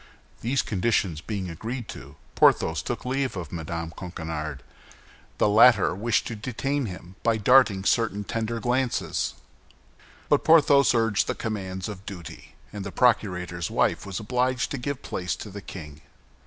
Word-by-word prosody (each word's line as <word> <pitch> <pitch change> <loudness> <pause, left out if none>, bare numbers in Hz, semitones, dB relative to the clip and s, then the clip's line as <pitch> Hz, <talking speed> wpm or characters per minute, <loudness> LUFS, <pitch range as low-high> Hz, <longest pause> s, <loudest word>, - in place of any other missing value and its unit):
These 130 +4 +1
conditions 95 -6 0
being 100 -1 -4
agreed 115 +8 -5
to, - - -9 0.2
Porthos 80 -3 +4
took - - -4
leave 130 -3 -1
of 85 -5 -6
Mme. 85 0 -4
Coquenard. 80 -6 -5 0.7
The - - +3
latter 110 0 +6
wished 110 +3 0
to 115 - -4
detain 130 +4 -2
him 90 0 -10
by 115 -1 +2
darting 110 -3 +5
certain 105 -1 +1
tender 115 +2 -3
glances; 125 +1 -1 0.9
but - - +3
Porthos 145 -4 +5
urged 115 -3 +2
the - - -1
commands 95 -3 -4
of 100 -3 -8
duty, 90 -5 -9 0.2
and 100 -2 -5
the 100 - -6
procurator's 90 -8 +1
wife - - +1
was 100 -2 -5
obliged 125 +3 0
to 140 - -3
give 140 +2 -4
place 90 0 -3
to 105 - -9
the 100 +1 -7
king. 75 -6 -9
105 Hz, 150 wpm, -26 LUFS, 90-125 Hz, 0.9 s, latter